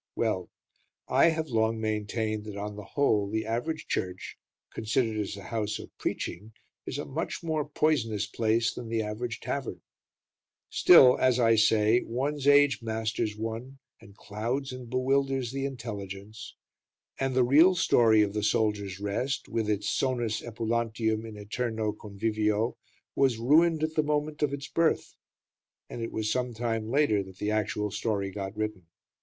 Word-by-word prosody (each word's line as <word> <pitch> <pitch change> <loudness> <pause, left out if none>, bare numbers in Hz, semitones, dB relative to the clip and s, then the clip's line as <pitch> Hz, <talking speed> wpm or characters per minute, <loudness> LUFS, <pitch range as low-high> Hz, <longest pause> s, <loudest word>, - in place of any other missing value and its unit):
Well, 105 -6 -1 0.6
I - - +5
have 160 -2 0
long 110 -1 +1
maintained 110 0 -2
that 105 -2 -7
on 105 +1 -5
the 105 - -8
whole 105 -5 +1
the 110 +1 -2
average 120 +8 -2
church, 90 0 -3 0.4
considered 110 0 0
as 100 -1 -3
a 100 - -9
house 105 -1 -2
of - - -11
preaching, 110 +2 -4 0.3
is - - -3
a 145 - -4
much 155 +5 -4
more 155 -3 -1
poisonous 120 -10 +1
place 115 +2 +1
than 120 -2 -7
the 115 -1 0
average 115 +3 -4
tavern; 140 -2 -4 0.9
still, 130 -8 +7
as 130 -1 +3
I 115 -1 +5
say, 110 +2 +4
one's 140 +4 -2
age 145 -4 +5
masters 110 -1 -2
one, 115 +5 -5 0.2
and 100 -2 -16
clouds 120 +6 -3
and 125 -2 -8
bewilders 135 0 0
the 135 0 -3
intelligence, 105 -4 -7 0.6
and 135 -1 -1
the 130 - +5
real 155 +9 +6
story 110 -9 +4
of 100 -1 -2
"The 105 - -1
Soldiers' 105 -3 0
Rest", 105 +7 -2
with 110 -2 -1
its 105 -1 0
"sonus 120 -1 0
epulantium 115 -1 -1
in 110 - -9
æterno 110 0 -3
convivio", 105 +2 -1 0.4
was 135 -4 +3
ruined 155 +6 +4
at 155 0 -1
the 155 - +2
moment 150 0 -2
of 150 -2 +2
its 140 0 -5
birth, 165 -1 +1 0.8
and 120 - -5
it 115 - -4
was 110 -1 -1
some 125 -2 -1
time 115 -1 -2
later 135 -6 +3
that 95 -1 -11
the 105 +2 -1
actual 105 -1 -1
story 100 -2 -2
got 95 +1 -6
written. 105 -5 -4
115 Hz, 160 wpm, -28 LUFS, 105-130 Hz, 0.9 s, still